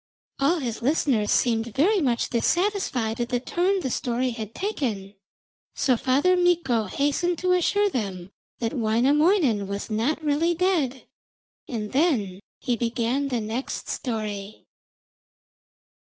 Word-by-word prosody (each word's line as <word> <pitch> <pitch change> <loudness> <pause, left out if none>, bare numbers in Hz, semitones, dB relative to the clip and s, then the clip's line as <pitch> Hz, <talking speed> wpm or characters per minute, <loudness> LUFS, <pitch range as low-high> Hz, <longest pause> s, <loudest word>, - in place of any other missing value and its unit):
All 280 +6 +3
his 245 -7 -4
listeners 250 -5 +1
seemed 230 -2 +1
very 385 +8 +3
much 245 -5 0
dissatisfied 250 - 0
at 240 - -2
the 245 - 0
turn 370 +9 0
the 260 - -2
story 245 +2 -1
had 220 -2 -7
taken, 230 - -3 0.6
so 255 - +2
Father 275 +10 +2
Mikko 340 -11 +2
hastened 290 - 0
to 365 +2 0
assure 405 +3 +3
them 195 - -4 0.3
that 230 -1 -2
Wainamoinen 255 - +2
was 200 +2 -5
not 250 +9 0
really 310 +4 +1
dead, 325 -8 0 0.6
and 215 -4 -4
then 255 - +1 0.2
he 245 -3 -1
began 235 +4 -1
the 250 -3 -1
next 225 +5 -4
story. 215 -4 -4
255 Hz, 125 wpm, -25 LUFS, 225-330 Hz, 0.6 s, All